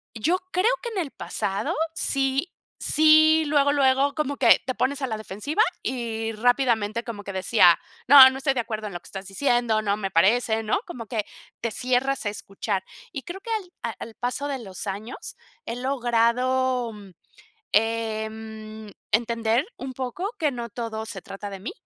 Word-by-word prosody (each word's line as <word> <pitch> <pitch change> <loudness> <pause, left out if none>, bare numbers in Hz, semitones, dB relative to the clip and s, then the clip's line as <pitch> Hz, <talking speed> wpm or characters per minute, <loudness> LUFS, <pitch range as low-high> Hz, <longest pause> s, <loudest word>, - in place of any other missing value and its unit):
yo 315 +12 +1
creo 390 +6 +3
que 475 - -4
en 445 - -6
el 310 -6 -3
pasado 195 0 -3 0.2
sí 275 +2 0 0.3
sí 315 +1 +5
luego 285 -1 +3
luego 275 0 +3
como 285 -2 -2
que 240 -3 +6
te 255 0 -2
pones 280 +1 0
a 265 - 0
la 220 -3 -3
defensiva 215 - -1 0.2
y 225 -3 -3
rápidamente 235 -1 +1
como 220 -4 -7
que 200 - -6
decía, 185 -2 +5 0.3
no 265 0 +11
no 265 - -6
estoy 270 0 +1
de 260 - -2
acuerdo 220 -2 -3
en 200 - -8
lo 175 - -5
que - - -16
estás 195 0 -7
diciendo, 235 +1 +1
no 205 -1 0
me 195 -2 -3
parece, 220 +5 +3
¿no? 215 - +1
Como 250 -10 -7
que 215 -2 -2 0.4
te 230 - -2
cierras 255 +3 0
a - - +1
escuchar, 195 -1 -4 0.3
y 275 - -6
creo 370 +2 -8
que 460 - -6
al 410 -5 -3
a - - -1
al 225 - -8
paso 250 +4 -2
de 275 -2 -3
los 195 -4 -7
años, 205 +5 -6 0.3
he 230 - -4
logrado, 250 0 +1 0.8
em, 220 -1 -2 0.2
entender 230 - +1
un 265 0 -6
poco 305 - -4
que 305 -3 +2
no 240 -3 -5
todo 225 -1 -5
se 195 -4 -7
trata 200 +1 -8
de 195 -1 -8
mí, 215 - -5
240 Hz, 180 wpm, -25 LUFS, 215-275 Hz, 0.8 s, no